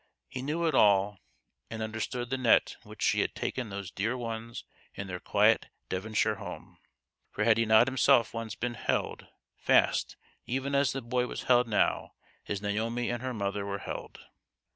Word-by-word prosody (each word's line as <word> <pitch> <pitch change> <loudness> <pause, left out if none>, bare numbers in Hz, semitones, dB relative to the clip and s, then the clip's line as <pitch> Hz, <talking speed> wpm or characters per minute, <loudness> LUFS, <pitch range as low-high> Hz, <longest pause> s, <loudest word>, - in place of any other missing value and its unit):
He 130 -1 -6
knew 155 +5 -1
it 160 - +1
all, 100 -3 +4 0.5
and 110 -1 -4
understood 115 +3 -4
the 135 - +1
net 120 -3 +4
in - - -17
which - - -7
she - - +3
had - - -2
taken 125 -4 -3
those 100 -2 -6
dear 115 +6 -1
ones 115 -1 -5 0.3
in 100 - -5
their 90 -2 -5
quiet - - +3 0.2
Devonshire 105 +4 0
home; - - -9 0.5
for 105 - -2
had 115 0 +4
he 115 - +2
not 110 +2 +6
himself 130 -3 +3
once 115 -2 -5
been 120 0 -3
held - - -2 0.3
fast - - +2 0.3
even 135 +3 -2
as 140 0 +3
the 135 -1 -4
boy 125 +1 0
was - - -6
held 125 -1 +4
now 105 - +1 0.3
as 100 -1 -3
Naomi 115 +4 -1
and 120 -1 -3
her 130 0 -3
mother 100 -3 -2
were 100 0 -3
held - - -7
115 Hz, 180 wpm, -29 LUFS, 105-125 Hz, 0.5 s, not